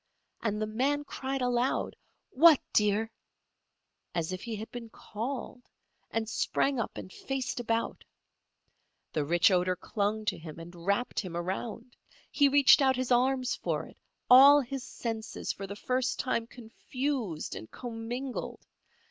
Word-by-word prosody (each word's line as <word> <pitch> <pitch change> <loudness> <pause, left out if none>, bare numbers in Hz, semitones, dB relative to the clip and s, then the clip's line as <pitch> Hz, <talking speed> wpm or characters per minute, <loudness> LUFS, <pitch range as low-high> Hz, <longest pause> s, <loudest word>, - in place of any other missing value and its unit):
And 210 -2 -1
the 215 - 0
man 265 +7 0
cried 270 -2 -4
aloud: 245 +1 0 0.4
"What, 310 +1 +7
dear?" 210 +2 +2 1.0
as 170 +1 -1
if 185 - -5
he 230 -2 -5
had 215 +1 -7
been 235 -2 -7
called, 245 +4 -6 0.5
and 225 -1 -2
sprang 270 +3 0
up 230 - -3
and 185 - -8
faced 265 -2 -3
about. 230 -1 -2 1.1
The 155 - 0
rich 175 +8 +4
odour 180 0 +2
clung 210 +3 -2
to 190 -5 -1
him 160 -1 -9
and 170 +1 -10
wrapped 200 +5 +1
him 180 -4 -4
around. 220 +7 -5 0.4
He 285 -1 +4
reached 280 0 +6
out 265 -1 +4
his 255 0 -2
arms 255 +1 +2
for - - -2
it, - - -16 0.3
all 275 +3 +9
his 270 -1 -4
senses 225 -2 -4
for 195 - -7
the 200 +1 -7 0.4
time 230 -3 -1
confused 240 - -4
and 110 - -8
commingled. 245 +2 -6
230 Hz, 140 wpm, -30 LUFS, 205-260 Hz, 1.1 s, all